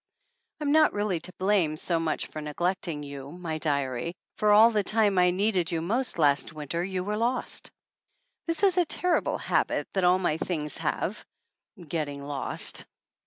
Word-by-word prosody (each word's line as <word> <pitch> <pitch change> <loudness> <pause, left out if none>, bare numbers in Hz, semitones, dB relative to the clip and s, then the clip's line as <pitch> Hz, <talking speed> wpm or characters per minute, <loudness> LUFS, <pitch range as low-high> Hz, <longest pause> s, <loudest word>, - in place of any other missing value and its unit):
I'm 295 -2 0
not 310 0 +5
really 205 -4 -1
to 180 +3 -6
blame 185 -5 +1
so 170 +1 0
much 160 -2 -1
for 155 - -7
neglecting 160 0 -2
you, 140 -1 -8
my 170 -2 -5
diary, 140 0 -1 0.2
for 210 -1 +3
all 220 +3 +7
the 215 -2 +2
time 205 -2 +2
I 180 0 +5
needed 185 -2 0
you 165 - 0
most 230 +10 -1
last 145 -3 +3
winter 155 +3 -3
you 185 -1 -3
were 210 +2 -2
lost. 240 +3 -1 0.8
This 330 +4 -1
is 375 -2 +4
a 350 - +3
terrible 355 +3 0
habit - - 0
that 190 - 0
all 180 +1 +5
my 175 -4 0
things 150 -4 -2
have - - -2 0.6
getting 150 -4 -4
lost. 140 -1 0
180 Hz, 165 wpm, -27 LUFS, 155-210 Hz, 0.8 s, all